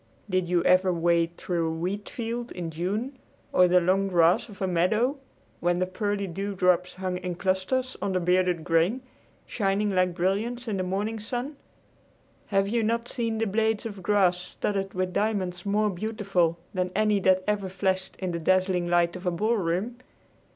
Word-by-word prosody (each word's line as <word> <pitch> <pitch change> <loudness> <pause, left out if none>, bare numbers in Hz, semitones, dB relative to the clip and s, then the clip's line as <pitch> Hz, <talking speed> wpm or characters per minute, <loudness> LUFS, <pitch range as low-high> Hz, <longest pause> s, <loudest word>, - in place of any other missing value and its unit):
Did 185 -3 0
you 175 -1 +2
ever 185 +1 +4
wade 170 0 +1
through 170 -2 -1
a 160 - -2
wheat 195 +5 -3
field 235 +1 -4
in 170 -2 -5
June 210 - -3 0.3
or 180 - +6
the 180 +1 +5
long 190 +3 +2
grass 175 +2 +3
of 200 - -12
a 190 - 0
meadow 210 - +1 0.4
when 175 0 +1
the 185 - +1
pearly 200 +2 -2
dewdrops 180 -1 0
hung 185 -1 -3
in 180 -1 -4
clusters 190 +8 -1
on 200 -1 -1
the 185 - +2
bearded 180 -1 +1
grain, 175 +10 +1 0.4
shining 205 -1 0
like 185 -2 +1
brilliants 215 +7 -1
in 210 -3 -1
the - - -1
morning 205 +4 -2
sun? 245 +6 -4 0.9
Have 195 -1 +2
you 230 +3 +1
not 230 +2 0
seen 230 -3 -1
the 225 - 0
blades 220 +1 0
of 205 -4 -6
grass 185 -2 +3
studded 195 +2 -3
with 185 0 -1
diamonds 190 -4 -1
more 210 +1 +2
beautiful 190 -4 0 0.2
than 185 -1 -1
any 210 0 +3
that 185 -1 +3
ever 205 -2 -1
flashed 190 0 -1
in 185 -2 -3
the 170 - -3
dazzling 185 +1 +2
light 175 0 +2
of 180 0 -6
a - - +3
ballroom? 205 +2 0
190 Hz, 175 wpm, -27 LUFS, 180-210 Hz, 0.9 s, or